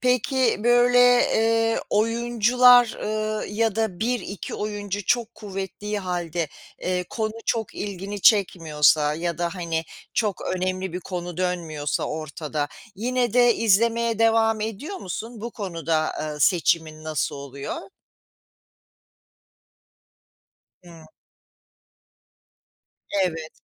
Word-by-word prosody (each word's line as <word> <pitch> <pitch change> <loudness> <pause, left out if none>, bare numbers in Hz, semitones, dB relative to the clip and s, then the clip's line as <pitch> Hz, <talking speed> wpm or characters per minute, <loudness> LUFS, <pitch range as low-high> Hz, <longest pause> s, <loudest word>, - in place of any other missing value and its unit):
Peki, 250 -2 +1
böyle, 245 +1 +5 0.2
eee, 225 0 +2
oyuncular, 240 +2 +4
ııı, 215 0 -2
ya 220 0 0
da 220 -5 -1
1-2 220 -4 -3
oyuncu 205 -1 -4
çok 235 +1 0
kuvvettiği 200 +1 -5
hâlde, 175 -4 -3 0.3
eee, 180 0 -1
konu 220 -2 -2
çok 225 -3 -1
ilgini 200 0 -5
çekmiyorsa 155 -7 +4
ya 170 +1 -3
da, 175 +2 -1
hani, 165 -3 -2 0.3
çok 210 -5 0 0.2
önemli 185 0 -2
bir 180 - -4
konu 175 -1 -6
dönmüyorsa 165 -5 -2
ortada, 155 -1 -4 0.3
yine 245 +2 -1
de 245 -1 +5
izlemeye 230 +1 +2
devam 225 -1 +3
ediyor 225 - -4
musun? 225 - -6
Bu 235 +2 -5
konuda, 165 -7 -2
ııı, 150 -1 -5
seçimin 160 -1 +2
nasıl 155 -2 -2
oluyor? 140 - -7 2.9
Hıı. 165 -2 -14 2.2
Evet. 160 -3 -4
200 Hz, 100 wpm, -24 LUFS, 170-225 Hz, 2.9 s, böyle